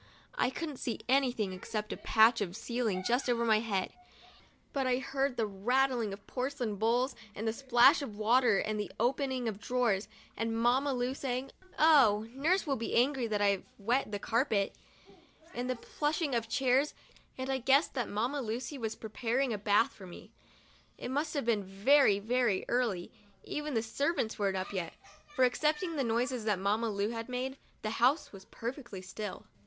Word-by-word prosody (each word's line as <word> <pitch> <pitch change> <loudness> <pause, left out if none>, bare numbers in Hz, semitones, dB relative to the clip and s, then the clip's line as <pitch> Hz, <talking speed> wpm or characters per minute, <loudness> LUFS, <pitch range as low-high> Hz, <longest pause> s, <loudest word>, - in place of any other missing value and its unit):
I - - +1
couldn't 300 0 -5
see 235 - -3
anything 245 -7 +1
except 210 +3 -4
a - - -7
patch 225 +1 +4
of 185 -3 -3
ceiling 225 -5 -2
just 245 +2 +1
over 235 -1 +1
my 220 -2 +4
head; 200 -4 -2 0.8
but 270 -2 0
I 250 -1 +2
heard 270 0 -1
the 225 - +1
rattling 235 +3 +1
of 200 +1 -9
porcelain 250 -5 -3
bowls 240 +5 +1 0.2
and 220 +2 -4
the 220 - +1
splash 260 +4 +5
of 220 -7 -6
water 230 0 +4
and 215 +1 -1
the 205 - -4
open 265 +4 +1
ing 250 -2 -2
of 210 -3 -3
drawers, 230 -5 0 0.3
and 225 0 -2
Mamma 250 +5 +2
Lu, 250 0 -1
saying, 265 -1 -3 0.3
"Oh, 250 -9 +5
nurse 320 +10 +1
will 275 -3 0
be 230 - -3
angry 255 0 +2
that 210 -2 0
I've 200 -2 +2
wet 235 +3 0
the 205 - -1
carpet," 220 -2 0 0.8
and 245 +1 -3
the 255 - 0
pushing 295 +4 -2
of 230 -1 -1
chairs, 265 +4 +2 0.4
and 260 +1 -3
I 265 - 0
guessed 270 +5 +3
that 250 -4 -2
Mamma 245 +7 -1
Lucy 245 +4 -4
was 220 -2 -3
pre 220 - -8
paring 245 +2 0
a - - -2
bath 205 +2 +3
for 190 - -12
me. 175 - -12 0.7
It - - -5
must 300 +3 -1
have 280 - -1
been 220 -4 +1
very, 205 +4 +4
very 225 -1 +1
early 225 -8 0 0.2
— 200 - -35
even 300 -2 -4
the 225 - +1
servants 255 -1 -1
weren't 195 -2 +1
up 185 +2 -4
yet, 180 -4 -4 0.3
for, 295 -4 +2
excepting 305 +6 0
the 280 - 0
noises 240 +1 0
that 210 -3 +2
Mamma 210 +4 0
Lu 205 +2 -1
made, 260 +2 -4 0.2
the 215 - -1
house 250 +7 +2
was 195 -1 -12
perfectly 235 -5 -7
still. 195 +2 -6
240 Hz, 185 wpm, -31 LUFS, 215-265 Hz, 0.8 s, splash